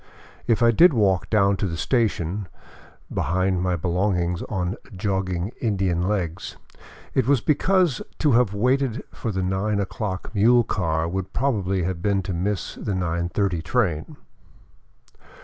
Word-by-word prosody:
If 115 0 +2
I 115 - +6
did 165 +6 +6
walk 95 -6 +2
down 100 -2 +3
to 100 - -1
the 85 -2 -4
station, 100 -5 0 0.7
behind 95 +1 0
my 90 -1 +1
belongings 90 0 0
on 95 -2 -2 0.2
jogging 95 -1 -2
Indian 95 -5 0
legs, 90 -5 -3 0.6
it 130 -3 +1
was 140 -2 +4
because 175 - +2 0.2
to 150 - +2
have 120 -3 +3
waited 125 +4 0
for 115 - -4
the 95 -1 -2
nine 95 +3 0
o'clock 100 0 -4
mule 120 +3 +5
car 80 -6 -1
would 95 +2 -4
probably 100 -8 0
have 90 -1 -3
been 100 0 +1
to 90 - -4
miss 95 +2 -2
the 100 - -4
nine 85 -1 -1
thirty 95 -4 0
train. 85 -3 -1
95 Hz, 145 wpm, -23 LUFS, 90-110 Hz, 0.7 s, I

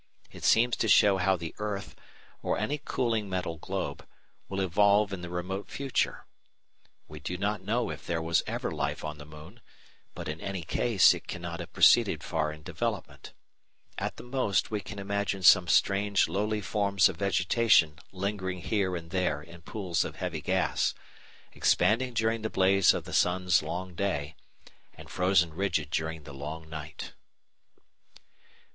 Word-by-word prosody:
It - - -12
seems 120 +2 +4
to 115 - 0
show 100 -2 +6
how 95 +1 +2
the 85 -2 -6
earth, 105 -2 -4 0.5
or - - -1
any 140 +8 -2
cooling 115 -8 -1
metal 90 -3 -3
globe, 85 -4 -5 0.4
will 95 - -3
evolve 100 +2 +3
in 95 - -5
the 90 - -6
remote 90 +3 -4
future. 135 -1 -2 0.8
We 75 +1 -10
do 90 - -4
not 100 +1 -1
know 115 +5 -1
if - - -9
there 85 -1 -1
was 80 +1 +1
ever - - -3
life - - -3
on 75 -1 -6
the 75 - -10
moon, 75 +10 -13 0.5
but - - -6
in 75 +1 -5
any 95 -3 -4
case 105 +3 +4
it - - -9
cannot 85 -1 -5
have 85 - -7
proceeded - - +5
far 75 -1 -1
in 75 0 -11
development. - - -4 0.7
At - - -4
the - - -9
most 125 -6 0
we 105 -1 -1
can 105 +2 -9
imagine 100 -1 -2
some 90 0 +7
strange 100 +2 +3
lowly 105 +2 -1
forms 100 -2 +2
of 95 -4 -5
vegetation 90 -3 +3
lingering 95 -1 -3
here 95 -2 0
and 85 -1 -7
there 90 -6 0
in 85 +1 -13
pools 90 -1 -2
of - - -6
heavy - - -4
gas, - - 0 0.6
expanding 120 +3 +2
during 110 0 +1
the 110 - -2
blaze 95 -2 +4
of - - -3
the - - -9
sun's 90 0 +3
long 90 +4 -5
day, 80 -5 -2 0.6
and - - -13
frozen 90 -3 +2
rigid 85 -4 -1
during 80 -1 -2
the 70 - -10
long 75 +4 -7
night. 80 -1 -8
95 Hz, 165 wpm, -29 LUFS, 85-105 Hz, 0.8 s, some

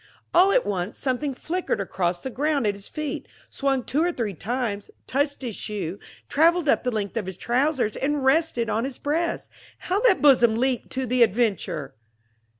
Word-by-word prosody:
All 375 +3 +6
at - - +3
once 185 0 -3
something 270 +1 -1
flickered 345 - -2
across 180 -2 -1
the 265 - -5
ground 285 0 0
at 205 - +2
his 200 0 -8
feet, 305 -2 -4 0.2
swung 270 -2 0
two 295 +7 0
or 350 - +2
three 230 - -3
times, 215 - -3 0.2
touched 285 +1 -1
his 235 -5 -4
shoe, 200 -3 -4 0.3
traveled 335 +2 +3
up - - +3
the 250 - +1
length 215 -2 -3
of 210 -5 -2
his 190 -1 -6
trousers 250 -1 +1
and 285 +1 -1
rested 270 -4 +2
on 220 +1 0
his 265 -1 -4
breast. 330 +4 -2 0.3
How 375 +3 -1
that 450 -4 +4
bosom 245 -6 +5
leaped 250 +1 0
to 260 0 -1
the 250 +1 +1
adventure! 210 - +1
255 Hz, 180 wpm, -24 LUFS, 215-295 Hz, 0.3 s, All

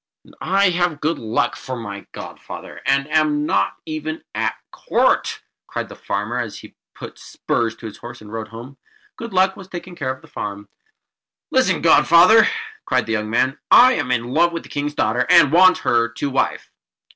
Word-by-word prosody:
"And - - -18
I 195 0 +2
have 175 -3 -1
Good 160 +3 -1
Luck 110 0 -1
for 130 - -6
my 100 -4 -8
godfather, - - -10
and 140 +1 +2
am 150 -1 +2
not 100 -5 0
even 155 0 -5
at - - -1 0.2
court!" - - 0 0.2
cried - - -5
the - - -10
farmer; 105 +5 -3
and 115 -3 -3
he - - -12 0.2
put - - -10
spurs 115 -1 -2
to 115 - -13
his 110 - -8
horse, 120 +1 -10
and 105 0 -13
rode 110 -1 -5
home. 120 +5 -11 0.4
Good 230 -1 -8
Luck 190 0 +2
was 190 - -12
taking 180 0 -8
care 145 -6 -4
of 130 - -9
the - - -15
farm. 100 0 -7 0.8
"Listen, - - +2
Godfather!" 180 +7 +6 0.4
cried - - 0
the 115 - -5
young 105 -1 -2
man. 130 +4 0
"I 255 +1 +7
am 125 - -2
in 120 0 -1
love 170 +3 +3
with 165 - -5
the - - -14
King's 145 +1 -3
daughter, 110 -1 0
and 140 - +6
want 185 +2 +6
her 115 0 +2
to 130 +4 -4
wife." 135 - -1
135 Hz, 190 wpm, -20 LUFS, 115-170 Hz, 0.8 s, I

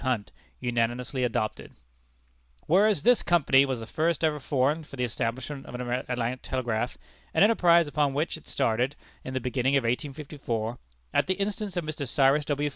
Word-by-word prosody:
Hunt, 125 -6 -1 0.3
unanimously 120 +2 -1
adopted: 110 -3 -2 0.9
Whereas, 200 +4 +3
This 245 +1 +5
Company 140 -5 +4
was 130 -3 -2
the - - -6
first 160 +7 0
ever 155 -2 +2
formed 145 +3 0
for - - -10
the 125 - -2
establishment 125 +4 -3
of - - -8
an 125 - -4 0.3
Atlantic 125 0 -2
Telegraph; 120 -2 -2 0.4
an - - +6
enterprise 175 -6 +5
upon 145 -2 0
which 155 +4 0
it 160 - -13
started 125 +1 0 0.3
in 130 - -6
the - - +1
beginning 130 +2 0
of 135 - +3
1854, 125 -2 -3 0.3
at - - +2
the 190 - +1
instance 200 0 -3
of 175 - 0
Mr. 155 -2 -4
Cyrus 140 +3 +3
W. 145 0 0
135 Hz, 170 wpm, -27 LUFS, 125-155 Hz, 0.9 s, an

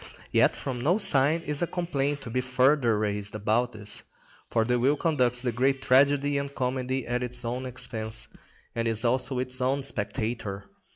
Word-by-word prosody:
Yet - - +4
from 125 -3 -4
no 170 +9 +3
side 155 -4 +3
is 150 -3 -2
a 175 - +1
complaint 145 -5 -2
to 115 - -7
be 125 +2 0
further 125 -2 +3
raised 105 0 -2
about 110 +4 +1
this; 105 -1 -3 0.5
for 115 -1 +1
the 125 +1 +1
will 135 +4 +3
conducts 125 -6 +1
the 125 - 0
great 135 +3 +1
tragedy 140 +2 +3
and 140 0 -5
comedy 130 0 -2
at 120 0 -1
its 125 -1 -4
own 125 +2 -3
expense, 115 -3 -3 0.5
and 115 0 -1
is 115 0 +1
also 130 +2 +1
its 130 +1 +1
own 135 +2 +1
spectator. 105 -3 -3
125 Hz, 175 wpm, -27 LUFS, 115-140 Hz, 0.5 s, Yet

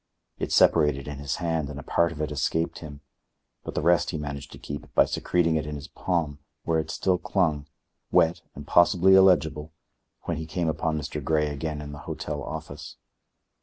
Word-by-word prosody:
It - - -3
separated 75 -4 +4
in 75 -1 -6
his 70 -2 -2
hand 80 -4 -2
and 70 -1 -7
a - - -8
part 85 +4 +1
of 80 - -9
it 75 - -3
escaped 80 +3 -1
him, 75 -3 -10 0.6
but - - -7
the - - -1
rest 85 +1 +3
he 80 - -3
managed 70 -2 -6
to - - -10
keep 70 +1 -8
by - - +6
secreting 85 -2 +1
it 75 -1 -3
in 75 - -4
his 70 +2 -8
palm, 80 -7 -2 0.2
where 80 -1 +1
it 80 - -4
still 90 +2 0
clung, 80 -8 0 0.4
wet 80 +1 +3
and 70 - -8
possibly 90 +3 +5
illegible, 80 -5 +4 0.5
when 85 - -2
he 80 0 -5
came 85 0 -1
upon 80 0 -1
Mr. 75 -1 -5
Grey 75 +1 +1
again 75 +1 -4
in 75 0 -7
the 70 - -9
hotel 75 -1 -4
office. - - -7
80 Hz, 195 wpm, -26 LUFS, 75-85 Hz, 0.6 s, by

